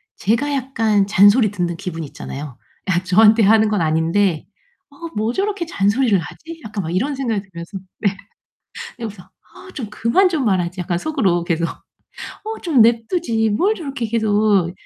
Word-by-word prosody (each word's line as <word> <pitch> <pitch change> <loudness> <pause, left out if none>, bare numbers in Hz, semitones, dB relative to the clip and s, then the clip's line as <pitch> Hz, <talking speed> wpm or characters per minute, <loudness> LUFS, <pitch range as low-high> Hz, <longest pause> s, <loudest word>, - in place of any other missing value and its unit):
제가 235 +9 0
약간 225 -7 +1
잔소리 205 +2 +5
듣는 175 -4 -2
기분 165 -2 -5
있잖아요. 140 -1 -8 0.3
아 180 -1 +1
저한테 215 +4 +5
하는 220 +2 +5
건 210 -4 0
아닌데 165 +2 +1 0.4
'어 280 - -21 0.2
뭐 220 +3 0
저렇게 395 -3 -2
잔소리를 215 - +2
하지?' 320 - -8
약간 210 -3 -4
막 165 +2 -3
이런 275 +9 0
생각이 230 -6 -2
들면서 180 -1 -9 0.2
네. 200 -2 0 0.8
그러면서 210 -6 -7
'아 380 - -18
좀 240 -7 -6
그만 230 - +2
좀 310 -7 -1
말하지.' 185 -3 0
약간 175 -1 -2
속으로 195 - 0
계속 170 -1 -1 0.6
'어 440 +1 -8
좀 310 -8 +2
내버려 230 0 +4
두지. 230 -11 0
뭘 375 - +2
저렇게 275 - -4
계속 210 -5 +1
215 Hz, 325 characters per minute, -19 LUFS, 185-260 Hz, 0.8 s, 잔소리